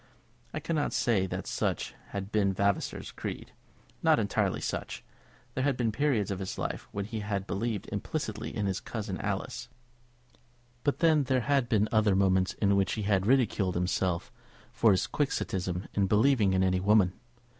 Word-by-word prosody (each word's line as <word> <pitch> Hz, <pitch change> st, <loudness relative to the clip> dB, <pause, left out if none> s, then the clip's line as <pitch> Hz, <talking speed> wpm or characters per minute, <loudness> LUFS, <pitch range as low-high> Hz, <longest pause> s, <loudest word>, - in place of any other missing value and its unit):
I -, -, -3 dB
cannot 155 Hz, -3 st, -1 dB
say 100 Hz, -6 st, +2 dB
that -, -, -4 dB
such -, -, -2 dB
had 100 Hz, 0 st, -5 dB
been 100 Hz, -3 st, +2 dB
Vavasor's 100 Hz, +1 st, -1 dB
creed, -, -, -6 dB, 0.5 s
not -, -, +5 dB
entirely -, -, 0 dB
such. -, -, -4 dB, 0.5 s
There 130 Hz, -, -1 dB
had 140 Hz, -2 st, +1 dB
been 115 Hz, -3 st, +1 dB
periods 115 Hz, -5 st, +1 dB
of 95 Hz, -, -3 dB
his 95 Hz, -, -4 dB
life -, -, -4 dB
when 100 Hz, -1 st, -3 dB
he 110 Hz, +1 st, -4 dB
had 100 Hz, -2 st, -2 dB
believed 110 Hz, +1 st, -2 dB
implicitly -, -, -3 dB
in 105 Hz, -, -2 dB
his 95 Hz, -1 st, -1 dB
cousin 105 Hz, -4 st, -5 dB
Alice; -, -, -3 dB, 1.1 s
but 145 Hz, -, 0 dB
then 155 Hz, -4 st, +4 dB
there 130 Hz, -1 st, +2 dB
had 135 Hz, -1 st, +1 dB
been 110 Hz, -3 st, +3 dB
other 110 Hz, -3 st, +3 dB
moments 95 Hz, -1 st, +3 dB
in 100 Hz, -1 st, +2 dB
which 100 Hz, -1 st, +2 dB
he 110 Hz, -, -2 dB
had 100 Hz, -1 st, +1 dB
ridiculed 110 Hz, -7 st, +2 dB
himself 90 Hz, 0 st, 0 dB, 0.4 s
for 115 Hz, -, +3 dB
his 95 Hz, -3 st, +3 dB
Quixotism 95 Hz, -10 st, -2 dB
in 100 Hz, -1 st, +2 dB
believing 110 Hz, -1 st, +4 dB
in 95 Hz, 0 st, +3 dB
any 95 Hz, -1 st, +2 dB
woman. 100 Hz, -1 st, +4 dB
100 Hz, 165 wpm, -29 LUFS, 95-120 Hz, 1.1 s, not